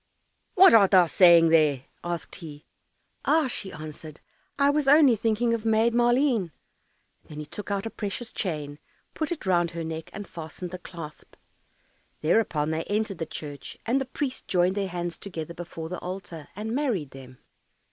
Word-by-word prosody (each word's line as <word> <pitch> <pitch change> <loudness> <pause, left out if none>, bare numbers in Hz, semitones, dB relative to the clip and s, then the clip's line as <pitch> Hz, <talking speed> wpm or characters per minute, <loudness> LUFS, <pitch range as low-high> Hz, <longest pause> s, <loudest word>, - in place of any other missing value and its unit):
"What 380 - +8
art 205 -4 +7
thou 185 -3 +6
saying 170 -1 +6
there?" 150 -5 +3 0.2
asked 175 -1 -4
he. 150 -3 -10 0.6
"Ah," 315 -1 +3
she 200 -6 -4
answered, 155 0 -9 0.4
"I 280 0 +4
was 295 -1 0
only 285 -3 +7
thinking 225 +2 +1
of 230 -2 -2
Maid 225 +1 +3
Maleen." 240 -4 +2 0.8
Then 150 - -11
he 150 - -5
took 205 +7 -8
out 200 0 -1
a 225 - -4
precious 220 +3 -5
chain, 150 -5 -4 0.3
put 315 0 -3
it 330 - -4
round 175 -2 +2
her 165 0 -5
neck, 160 0 -6
and 205 0 -8
fastened 170 +2 -8
the 185 - -6
clasp. 165 -4 -10 0.9
Thereupon 155 -3 +1
they 160 +1 -1
entered 205 -3 -2
the 165 - -3
church, 145 -3 -8
and 255 +4 +1
the - - -2
priest 260 0 -4
joined 180 0 +2
their 200 -1 -1
hands 175 -1 -4
together 170 -4 -6
before 165 -1 -7
the 180 +1 -5
altar, 180 -4 -7
and 215 +3 -4
married 240 - -1
them. 130 -1 -12
185 Hz, 170 wpm, -26 LUFS, 160-225 Hz, 0.9 s, What